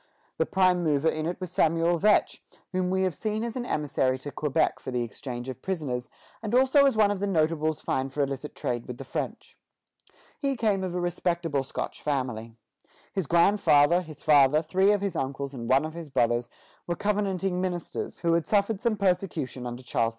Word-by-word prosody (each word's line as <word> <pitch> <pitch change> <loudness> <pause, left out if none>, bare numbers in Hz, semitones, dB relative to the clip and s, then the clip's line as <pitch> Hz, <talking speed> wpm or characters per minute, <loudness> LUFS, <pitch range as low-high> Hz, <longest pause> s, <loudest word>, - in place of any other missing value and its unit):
The - - +2
prime 185 -2 +3
mover 155 0 +2
in 155 0 -2
it 175 - -3
was 185 -3 -6
Samuel 165 +1 +2
Vetch, 210 +3 +3 0.3
whom 185 -1 0
we 190 0 +1
have 185 -2 +1
seen 215 +7 -2
as 235 -1 -4
an 245 -1 -3
emissary 135 -3 0
to 145 +2 -7
Quebec 150 +2 0
for - - -7
the 125 -1 -1
exchange 120 +2 -6
of 130 0 -6
prisoners, 140 -10 -3 0.3
and 220 +1 -1
also 265 +2 +5
as 265 - +1
one 210 -2 +5
of 205 - -2
the 200 - -1
notables 155 -3 +1
fined 130 0 -1
for 145 +1 0
illicit 140 +1 -4
trade 120 -1 -3
with 125 - -6
the - - -7
French. - - -5 0.8
He 275 -2 0
came 210 -4 +1
of 180 -1 -3
a - - 0
respectable 170 -4 -1
Scotch 135 - -5
family. 125 -6 -3 0.6
His 190 -6 -2
grandfather, 170 -2 +4
his 155 -4 -11
father, 150 0 +5
three 190 +5 +3
of 205 -1 +1
his 200 -3 -2
uncles, 140 +1 -3
and 120 -3 -6
one 135 +4 +4
of 155 - -6
his 165 -2 -8
brothers 120 -2 +1 0.4
were 175 - -1
Covenanting 195 -3 -1
ministers, 180 -2 -4
who 170 -1 +2
had 170 -1 +1
suffered 205 0 +1
some 235 -3 +1
persecution 180 -10 -1
under 120 +1 -7
Charles 115 -2 +1
II. - - 0
165 Hz, 200 wpm, -27 LUFS, 135-190 Hz, 0.8 s, also